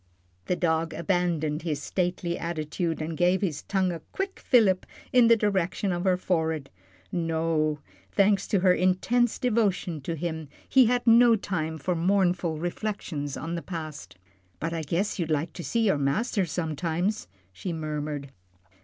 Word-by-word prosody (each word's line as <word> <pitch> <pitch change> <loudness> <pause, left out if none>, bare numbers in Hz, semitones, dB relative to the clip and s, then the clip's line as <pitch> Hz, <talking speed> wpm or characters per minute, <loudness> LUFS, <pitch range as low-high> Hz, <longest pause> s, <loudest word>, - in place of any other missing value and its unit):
The 180 - +1
dog 165 -2 0
abandoned 170 -3 0
his 155 -3 -2
stately 175 +1 -1
attitude, 165 0 -2
and 160 +1 -4
gave 180 +3 +2
his 165 -7 -1
tongue 190 -2 0
a 170 - -5
quick 390 0 -3
fillip 205 -7 +3 0.3
in 245 -2 +6
the 230 - +7
direction 195 -2 0
of 175 +1 -2
her 185 -1 +3
forehead. 160 -5 -1 0.4
No 160 -3 0 0.3
thanks 200 0 +3
to 200 - +1
her 185 -1 +5
intense 200 +7 +2
devotion 205 - 0
to 165 +5 -3
him, 160 -2 -4 0.2
he 260 -3 +6
had 245 +1 +1
no 235 0 +7
time 160 -6 -3
for 180 +4 -1
mournful 175 -2 +1
reflections 170 -5 -3
on 165 +4 -4
the 170 - -3
past. 155 - -7 0.4
"But 165 +1 -2
I 165 - -2
guess 175 +7 -1
you'd 165 -2 -1
like 155 +1 -1
to 175 - -7
see 230 - 0
your 195 -9 +2
master 190 - 0
sometimes," 170 +5 -2 0.3
she 175 - -5
murmured. 150 -3 -4
175 Hz, 155 wpm, -27 LUFS, 160-195 Hz, 0.4 s, the